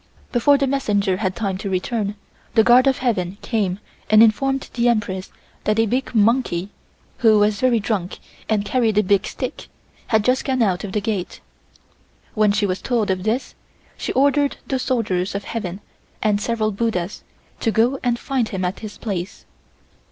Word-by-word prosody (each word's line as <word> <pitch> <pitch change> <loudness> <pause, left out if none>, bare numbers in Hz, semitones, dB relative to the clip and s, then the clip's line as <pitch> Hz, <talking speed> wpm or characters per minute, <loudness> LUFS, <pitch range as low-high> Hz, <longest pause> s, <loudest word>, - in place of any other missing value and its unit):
Before 280 +4 +4
the 275 - +1
messenger 205 -8 0
had 190 -2 -2
time 195 -4 -2
to 200 - -4
return, 200 +2 -2 0.4
the 220 - +6
Guard 245 +3 +6
of 270 - +3
Heaven 200 -7 -1
came 200 -6 -1 0.3
and 215 +1 +7
informed 270 +5 +2
the 240 0 +2
Empress 200 -5 -1 0.4
that 215 0 +1
a 225 - +4
big 250 +3 -2
monkey, 210 -4 +2 0.5
who 220 -3 +5
was 205 0 +2
very 250 -3 +3
drunk 200 -4 -2 0.3
and 210 -2 +1
carrying 225 -1 +1
a 210 - +5
big 200 +1 +2
stick, - - -5 0.4
had 220 -2 +2
just 255 +1 +2
gone 260 -3 +1
out 190 -3 0
of 195 -2 -6
the 210 - 0
gate. 200 -4 -3 0.9
When 215 -2 +3
she 205 0 +1
was 185 -1 -2
told 235 -5 0
this, 215 +7 -1 0.4
she - - -4
ordered 285 +1 +2
the 265 - -1
soldiers 205 -8 -1
of 200 - -3
heaven 200 -4 -5 0.4
and 210 -1 +2
several 220 -1 0
buddhas 200 -3 -2 0.4
to 225 - 0
go 235 +5 +2
and 240 -1 +1
find 255 -2 -1
him 185 -2 -2
at 180 +2 -3
his 215 -2 -8
place. 195 -3 -5
215 Hz, 175 wpm, -21 LUFS, 200-240 Hz, 0.9 s, and